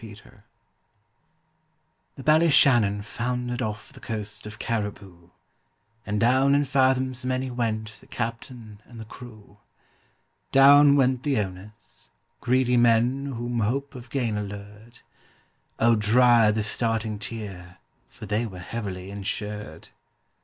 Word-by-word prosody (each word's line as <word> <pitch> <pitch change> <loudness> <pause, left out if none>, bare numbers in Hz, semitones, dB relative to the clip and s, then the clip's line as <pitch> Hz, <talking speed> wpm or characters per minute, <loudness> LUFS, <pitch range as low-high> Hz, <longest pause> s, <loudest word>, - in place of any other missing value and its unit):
THE 135 - -10
Ballyshannon 135 -10 +4
foundered 125 +2 -3
off 110 +3 -5
the 135 - -14
coast 105 -3 -6
of 105 0 -9
Cariboo, 100 -6 -5 0.8
And 105 0 -1
down 130 +4 +3
in 145 0 +2
fathoms 130 -1 +1
many 130 0 -2
went 110 -3 -3
the - - -20
captain 115 -2 -6
and 120 -2 -13
the 110 - -8
crew; 110 -3 -14 0.9
Down 140 +1 +7
went 130 -2 +2
the 140 -2 0
owners—greedy 105 +5 -3
men 120 +4 +2
whom 120 0 -3
hope 135 +6 -2
of 125 -2 -11
gain 120 -6 -1
allured: 105 +3 -9 0.8
Oh, 115 +1 +4
dry 115 +1 +4
the 105 0 0
starting 110 0 -2
tear, 95 -5 -8 0.3
for - - -11
they 105 +3 -1
were 95 -4 -10
heavily 95 -1 -6
insured. 105 +1 -6
115 Hz, 115 wpm, -25 LUFS, 105-125 Hz, 0.9 s, Down